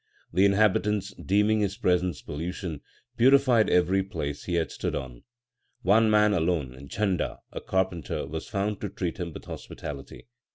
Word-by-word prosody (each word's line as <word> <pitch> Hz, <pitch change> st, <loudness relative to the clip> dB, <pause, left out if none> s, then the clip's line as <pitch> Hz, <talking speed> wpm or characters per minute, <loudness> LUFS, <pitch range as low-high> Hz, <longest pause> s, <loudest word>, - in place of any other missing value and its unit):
The 95 Hz, +3 st, +5 dB
inhabitants, 105 Hz, 0 st, +2 dB
deeming 105 Hz, +2 st, +2 dB
his 100 Hz, -1 st, -1 dB
presence 90 Hz, -7 st, +1 dB
pollution, 85 Hz, +1 st, -5 dB, 0.4 s
purified 130 Hz, -2 st, +5 dB
every 90 Hz, +2 st, +3 dB
place 80 Hz, -7 st, -5 dB
he 90 Hz, -, -1 dB
had 85 Hz, -1 st, 0 dB
stood -, -, -3 dB
on. 60 Hz, -3 st, -6 dB, 0.6 s
One 110 Hz, +4 st, +5 dB
man 105 Hz, -1 st, +4 dB
alone, 75 Hz, -7 st, -1 dB
Jhanda, 100 Hz, -4 st, -1 dB
a -, -, -6 dB
carpenter, 95 Hz, -6 st, -1 dB
was 80 Hz, +2 st, -6 dB
found 100 Hz, 0 st, -2 dB
to 105 Hz, -, -3 dB
treat 90 Hz, +1 st, -4 dB
him 85 Hz, -2 st, -3 dB
with -, -, -10 dB
hospitality. 70 Hz, -2 st, -8 dB
95 Hz, 150 wpm, -27 LUFS, 85-105 Hz, 0.6 s, The